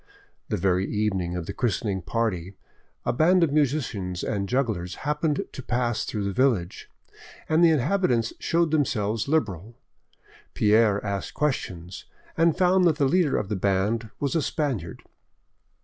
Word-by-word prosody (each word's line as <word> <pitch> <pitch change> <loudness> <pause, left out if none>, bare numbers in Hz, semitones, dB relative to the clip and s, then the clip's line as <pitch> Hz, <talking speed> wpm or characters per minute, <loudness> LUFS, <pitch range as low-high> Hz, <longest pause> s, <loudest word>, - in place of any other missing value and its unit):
The - - 0
very 95 +1 +1
evening 95 -5 -1
of 90 -2 -4
the - - -5
christening 105 -5 -1
party, 95 -1 -2 0.5
a - - +1
band 170 +7 +4
of 150 -4 +1
musicians 125 -12 -1
and 100 -2 -2
jugglers 105 -9 -1
happened 150 0 0
to - - -7
pass 120 -2 -1
through 105 -2 -3
the 100 0 -2
village, 110 -7 0 0.6
and 160 +2 +3
the 170 - +7
inhabitants 145 - +1
showed 165 -1 +1
themselves 115 -8 0
liberal. 115 - -1 0.8
Pierre 105 -1 +3
asked 100 -1 -4
questions, 95 - -3 0.3
and 165 0 +3
found 185 0 +4
that 165 -3 +4
the 145 -2 +1
leader 165 +1 +2
of 105 - -2
the 105 - -2
band 100 +4 0
was 140 -2 -1
a 165 - +2
Spaniard. 130 - -3
115 Hz, 150 wpm, -25 LUFS, 100-150 Hz, 0.8 s, the